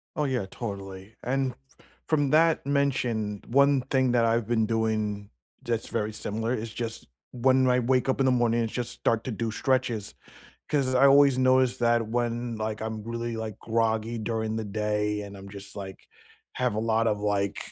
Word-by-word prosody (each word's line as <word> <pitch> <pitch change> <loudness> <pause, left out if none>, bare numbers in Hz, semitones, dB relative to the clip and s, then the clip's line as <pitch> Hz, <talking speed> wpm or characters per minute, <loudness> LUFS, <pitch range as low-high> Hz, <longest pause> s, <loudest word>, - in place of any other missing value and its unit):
Oh, 150 - 0
yeah, 130 -7 -1
totally. 100 -2 -7
And 135 +1 0
f - - -17 0.5
from 145 -4 +1
that 160 -1 +4
mention, 125 -7 0
one 140 +2 +4
thing 130 -1 +1
that 120 -1 +3
I've 115 -1 +1
been 115 -2 +2
doing 110 -2 -1 0.3
that's 115 -1 -2
very 110 -2 -2
similar 110 +2 -2
is 110 -2 -4
just 115 0 -5 0.2
when 130 +1 +3
I 125 0 +3
wake 125 +2 +1
up 130 - +1
in 135 - +3
the 130 - +4
morning, 120 -1 +2
I - - 0
just 120 +2 -4
start 115 -1 0
to 130 - -3
do 115 +1 -2
stretches, 120 -4 -1 0.6
'cause 135 -3 +1
I 130 +2 +6
always 140 -1 +6
notice 130 -1 +3
that 120 -2 +2
when, 120 0 -2
like, 110 0 -3
I'm 110 -1 -4
really, 115 0 -4
like, 110 -2 -5
groggy 115 0 0
during 110 0 -2
the 110 - -2
day 105 0 -1
and 100 -1 -9
I'm 100 0 -10
just, 100 0 -10
like 95 -2 -7 0.6
have 125 -4 +1
a - - 0
lot 115 0 +1
of, 105 -1 -1
like 100 -1 0
115 Hz, 185 wpm, -27 LUFS, 110-130 Hz, 0.6 s, I